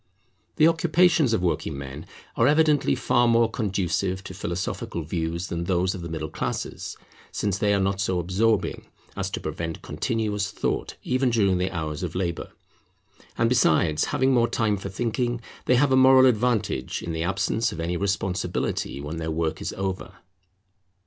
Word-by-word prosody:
The 155 - +5
occupations 165 -3 +3
of 110 -5 +1
working 85 -5 -1
men 70 +2 -8 0.3
are 115 - +3
evidently 150 0 +3
far 120 0 +2
more 115 0 +4
conducive 95 -3 -1
to 95 - -8
philosophical 85 -2 -4
views 80 +2 -3
than 85 0 -3
those 90 0 +1
of 95 - -6
the 85 - -6
middle 80 -1 -4
classes; - - -4 0.3
since 100 -2 -1
they 105 - +2
are 100 - +3
not 95 0 0
so 95 -2 0
absorbing, 95 +6 0 0.3
as - - -2
to - - -4
prevent 80 -1 -5
continuous 105 -3 -2
thought, - - -2
even 130 0 +1
during 100 -6 +2
the 90 +1 0
hours 80 -3 -4
of 90 -3 -4
labour. 85 -2 -2 0.9
And 115 - +3
besides 80 -10 +3
having 130 +1 +1
more 120 -2 +3
time 110 -2 +1
for 95 0 -6
thinking, 120 +4 -1 0.3
they 125 - +4
have 135 +2 +3
a - - +5
moral 130 0 +7
advantage 110 - +1
in 85 - -4
the 80 - -3
absence 95 +5 0
of 80 - -7
any 85 +2 -1
responsibility 95 -7 -2
when 75 +3 -5
their 80 0 -3
work 80 0 -2
is - - -3
over. 95 -1 -4
95 Hz, 170 wpm, -25 LUFS, 85-120 Hz, 0.9 s, moral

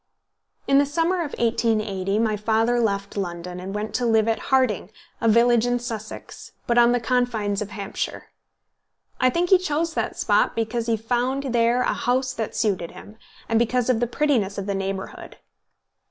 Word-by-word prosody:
In 275 0 +5
the 285 - +4
summer 330 +5 0
of 325 -5 -3
1880 215 -4 0
my 220 -1 +1
father 225 +3 +1
left 200 -3 -1
London, 180 -2 -4
and 190 +2 -6
went 210 +1 -4
to 250 - 0
live 220 -1 +3
at 225 - +1
Harting, 255 -8 +2 0.3
a 230 - +2
village 235 +1 +4
in 245 0 +1
Sussex, 225 -3 -8
but 240 0 +3
on 240 0 +6
the 245 - +2
confines 225 -4 0
of 210 - -4
Hampshire. 200 -1 -5 0.9
I 255 - +4
think 345 +7 0
he 380 - +7
chose 330 -1 -1
that - - -2
spot - - +2
because 230 +1 -2
he 230 -1 +1
found 250 +4 -1
there 235 +1 +3
a - - +1
house 255 +1 0
that 225 -3 -4
suited 190 -7 0
him, 210 +2 -13 0.3
and 225 - +2
because 245 +1 +1
of 230 - 0
the 240 - +1
prettiness 240 -7 0
of 200 - -3
the 200 - -2
neighbourhood. 195 0 -5
230 Hz, 180 wpm, -23 LUFS, 210-250 Hz, 0.9 s, he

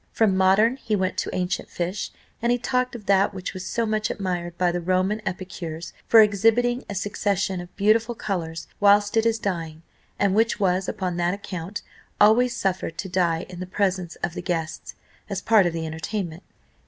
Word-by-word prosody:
From 215 -4 +2
modern 195 +6 +4
he 215 -5 -1
went 190 -1 0
to - - -1
ancient 180 0 -2
fish, 180 +4 -3 0.3
and 235 +1 +2
he 245 - +3
talked 250 0 -1
of 215 -4 -9
that 195 0 +3
which 185 0 -5
was 185 -1 -6
so 230 -1 0
much 215 0 0
admired 175 -3 -3
by 180 -1 +2
the 175 0 -2
Roman 185 +4 +1
epicures 175 -3 -5
for 225 - +8
exhibiting 225 +4 +3
a 205 - -4
succession 195 -1 -1
of 175 - -12
beautiful 225 +3 +2
colours 165 -7 -4
whilst 205 +1 +4
it 225 0 +3
is 225 0 +2
dying; 165 -6 -4 0.3
and 200 -2 +2
which 225 +1 +2
was, 185 -1 +1
upon 185 -4 -3
that 175 +2 +1
account, 195 -1 -6 0.4
always 235 +4 +5
suffered 185 -3 -2
to 190 - -4
die 175 -2 +1
in 180 -1 -10
the 185 - -5
presence 185 -2 -1
of 175 - -1
the - - -5
guests, 165 -3 -3 0.3
as - - -2
part 215 -5 +4
of - - 0
the 165 -1 -3
entertainment. 165 +2 -4
190 Hz, 190 wpm, -24 LUFS, 180-215 Hz, 0.4 s, for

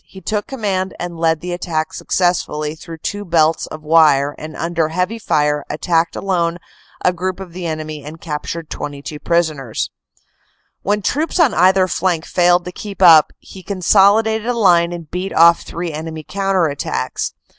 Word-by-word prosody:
he 190 - -12
took 210 +1 -3
command 195 -7 -2
and 175 -1 -5
led 160 -2 +1
the 180 0 -4
attack 160 -3 -2
successfully 155 -4 -1
through 165 +1 -10
two 205 +6 -4
belts 165 -3 +2
of 155 0 -9
wire, 150 -3 +4
and 155 +1 -8
under 165 -1 -1
heavy 180 +7 -2
fire 150 -6 +1
attacked 165 +2 0
alone 175 -3 -1 0.5
a 180 - +4
group 185 +1 -3
of 185 -3 -9
the 175 -1 -5
enemy 155 -2 -5
and 155 +3 -9
captured 160 +1 -5
22 145 +1 -6
prisoners. 155 -9 -1 0.9
When 205 +1 -1
troops 315 - -1
on 305 -9 +4
either 185 +2 +4
flank 175 -2 -1
failed 175 0 +3
to 180 - -5
keep 200 +1 -8
up 165 -5 +7
he 190 - -13
consolidated 205 +4 +3
a 245 - +1
line 175 -6 +4
and 170 -3 -8
beat 180 +2 -4
off 170 +1 +6
three 170 0 -5
enemy 160 +1 -6
counter 195 -2 +1
attacks. 145 -3 -3
170 Hz, 165 wpm, -18 LUFS, 155-190 Hz, 0.9 s, up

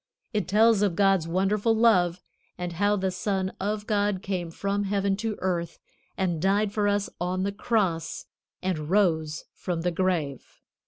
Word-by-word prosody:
It 210 - -1
tells 215 +2 +4
of 200 -5 +2
God's 195 -4 +3
wonderful 200 +6 +1
love, 185 -6 +3 0.3
and 180 -1 -4
how 205 +4 +2
the 190 -1 -1
Son 190 -1 -2
of 210 +2 -2
God 205 -3 0
came 180 -3 -2
from 200 +4 -2
heaven 200 0 +1
to 220 0 -2
earth 170 -3 -2 0.4
and 175 -5 0
died 200 +2 +2
for 210 -1 +1
us 205 0 +1
on 185 +1 -1
the 200 - 0
Cross 195 -6 -1 0.4
and 160 -5 -2
rose 160 -6 +1
from 175 -3 -3
the 175 +1 0
grave. 165 -6 -2
190 Hz, 160 wpm, -26 LUFS, 175-205 Hz, 0.4 s, tells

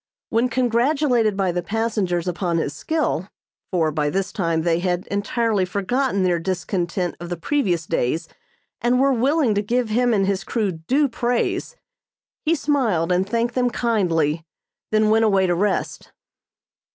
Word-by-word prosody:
When 230 +3 +2
congratulated 245 -2 +2
by 190 -2 +1
the 175 +1 -2
passengers 200 -4 -1
upon 175 -1 -1
his 150 -3 -1
skill, 210 - -1 0.4
for 165 -4 +1
by 150 -1 0
this 190 +5 -2
time 165 -4 0
they 170 0 +2
had 180 0 -1
entirely 205 0 0
forgotten 200 +3 0
their 175 -2 +2
discontent 180 0 -2
of 175 0 -7
the 175 - -3
previous 175 - 0
days 160 +7 -1 0.5
and 245 +1 +2
were 275 0 +4
willing 265 0 +2
to 205 - +1
give 235 +2 0
him 245 +3 +2
and 200 -3 +2
his 195 0 -1
crew 215 -5 -1
due 250 - +1
praise, 245 - -1 0.7
he 330 +1 +2
smiled 235 - +1
and 185 +2 +1
thanked 235 +1 0
them 250 0 +1
kindly, 170 -10 0 0.5
then 215 0 +3
went 225 +1 +4
away 195 -3 +3
to 175 - +2
rest. 195 +3 -1
200 Hz, 155 wpm, -22 LUFS, 175-240 Hz, 0.7 s, were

